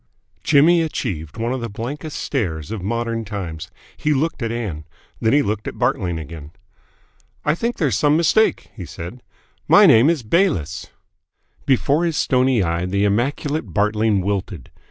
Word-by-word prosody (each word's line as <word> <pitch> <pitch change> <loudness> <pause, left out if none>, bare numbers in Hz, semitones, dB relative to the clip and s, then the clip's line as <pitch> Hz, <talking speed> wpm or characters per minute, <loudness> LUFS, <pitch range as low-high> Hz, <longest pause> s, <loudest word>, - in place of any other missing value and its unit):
Jimmy 160 +4 +5
achieved 95 - -4
one 115 +2 -1
of 130 - -3
the 115 - -4
blankest 140 +9 -6
stares 85 - -3
of 110 -4 -4
modern 115 +3 -2
times. 85 -7 -6 0.3
He 150 -1 0
looked 155 +1 -1
at 115 -1 -2
Ann. 105 -10 -4 0.4
Then 110 - +1
he 145 +2 +4
looked 105 -2 -3
at - - -6
Bartling 105 -9 0
again. 75 -1 -9 0.9
"I 150 - +3
think 235 +8 -2
there's 135 - +1
some 145 +6 +3
mistake," 215 +6 +2
he 100 - -7
said. 85 +9 -8 0.5
"My - - +7
name 115 +7 +6
is 165 -7 0
Bayliss." 110 - 0 0.8
Before 140 +4 +2
his 165 -3 -1
stony 130 -4 +2
eye 85 +1 -1
the 100 +2 0
immaculate 120 - -1
Bartling 105 0 +2
wilted. 95 - -4
115 Hz, 155 wpm, -20 LUFS, 95-145 Hz, 0.9 s, My